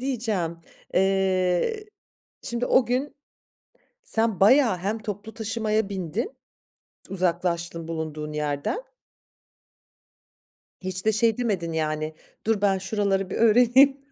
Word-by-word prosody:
diyeceğim. 220 -10 -2 0.4
Eee, 190 - +1 0.6
şimdi 240 0 -2
o 255 - +4
gün 255 +4 -1 0.9
sen 225 -4 0
bayağı 225 -2 +5
hem 205 +5 -2
toplu 210 +1 -6
taşımaya 220 -1 -1
bindin, 195 - -4 0.7
t - - -10
uzaklaştın 170 -2 -1
bulunduğun 155 -2 -4
yerden. 150 - -2 2.0
Hiç 185 +1 -4
de 220 - +4
şey 225 +1 +2
demedin 195 -9 -1
yani, 155 0 -2 0.3
"Dur, 220 -2 +1
ben 195 -2 +3
şuraları 195 -1 -1
bir - - -4
öğreneyim, 245 +5 +5
200 Hz, 105 wpm, -25 LUFS, 175-230 Hz, 2.0 s, bayağı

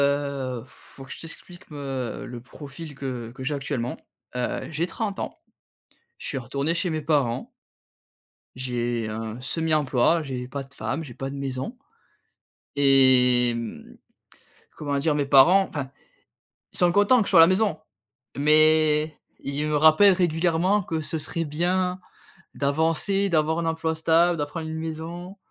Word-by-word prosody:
Heu, 140 -4 -1
faut 130 +2 -11
que 130 - -13
je - - -8
t'explique, 175 +2 -11
me 135 -4 -5
le 120 -1 -8
profil 145 +4 -10
que 125 -4 -5
que 130 - -9
j'ai 140 +4 -1
actuellement. 135 -3 -3 0.4
Heu, 125 0 -3
j'ai 160 +3 -1
30 200 +2 -4
ans, - - -6 0.8
je - - -9
suis 135 - -2
retourné 140 +5 -2
chez 175 +1 -1
mes 155 -1 -2
parents 145 -6 0 1.1
j'ai 120 -2 -2
un 110 +1 -5
semi-emploi, 155 +1 +1
j'ai 130 -3 -5
pas 140 0 -5
de 135 0 -18
femme, 145 +3 -3
j'ai 125 - -10
pas 135 +3 -5
de 140 - -7
maison 135 - -4 1.0
et 130 -3 +5
mmh, 115 -2 -7 0.8
comment 145 -2 -2
dire? 150 +2 +1
Mes 145 -1 +1
parents 170 +8 +6
enfin, 140 -3 -5 0.8
ils - - -7
sont 175 -1 +4
contents 205 +6 +5
que 205 - 0
je - - -1
sois 180 -4 +7
à - - +11
la - - +9
maison, 190 -3 +1 0.6
mais 155 +1 +4 0.2
ils 140 +2 -3
me 150 -1 0
rappellent 160 +7 +6
régulièrement 175 +3 +1
que 160 -3 -3
ce 160 +1 -4
serait 165 +2 -3
bien 180 +4 -1 0.5
d'avancer, 165 +7 0
d'avoir 160 0 +1
un 165 - -2
emploi 160 0 -1
stable, 165 +2 +3
de 145 - -1
prendre 160 +2 -6
une 160 0 -4
maison, 165 +4 -6
150 Hz, 160 wpm, -25 LUFS, 135-165 Hz, 1.1 s, à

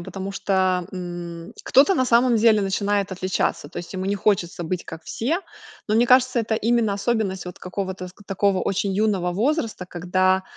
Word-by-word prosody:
потому 190 +3 -6
что, 185 -2 +1
м, 175 -2 -7
кто-то, 285 +9 +5
на 260 - +2
самом 240 0 +4
деле, 220 -1 +5
начинает 200 0 0
отличаться. 185 0 -1
То - - -7
есть 175 +2 -8
ему 185 0 -4
не 200 - +1
хочется 185 -4 0
быть 175 +1 -3
как 165 0 -9
все. 300 - -1 0.5
Ну 210 - +2
мне 235 +2 +4
кажется, 255 0 +4
это 225 0 -1
именно 225 -1 +1
особенность 200 -3 -1
вот 180 - -8
какого-то 185 0 -5
ск 190 +3 -17
такого 195 -1 +1
очень 195 0 -1
юного 195 -3 +1
возраста, 230 - -1
когда, 185 +2 +1
195 Hz, 175 wpm, -23 LUFS, 185-220 Hz, 0.5 s, кто-то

